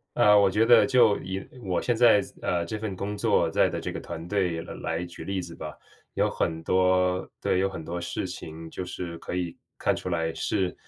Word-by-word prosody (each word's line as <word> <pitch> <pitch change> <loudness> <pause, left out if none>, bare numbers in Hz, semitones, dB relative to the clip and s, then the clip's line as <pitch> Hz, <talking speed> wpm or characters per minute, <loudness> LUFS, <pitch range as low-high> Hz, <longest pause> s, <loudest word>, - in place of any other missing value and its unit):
呃， 105 0 +6
我 100 -1 +5
觉 105 +4 +3
得 120 +1 +7
就 120 -6 +5
以 95 +1 -5 0.2
我 95 -5 -1
现 120 - +1
在 115 -3 +6
思 - - -10
呃， 85 -1 0
这 110 +6 -4
份 105 -3 -4
工 100 +3 -4
作 - - +2
在 - - +3
的 - - -4
这 - - -4
个 - - -5
团 80 - -7
队 90 -5 0
来 - - -8
来 80 +2 -3
举 85 - -10
例 95 -1 -2
子 85 -1 -8
吧。 75 -3 -8 0.4
有 - - +2
很 80 0 -2
多 90 0 +2
对， 90 - +1
有 95 - +2
很 85 -4 -6
多 85 +2 -4
事 85 - -3
情 80 +1 -7
就 90 - -5
是 85 -1 -6
可 85 - -6
以 90 -2 -3 0.2
看 - - +1
出 - - -6
来 80 -2 -1
是， 90 +3 -1
90 Hz, 245 characters per minute, -27 LUFS, 85-100 Hz, 0.4 s, 得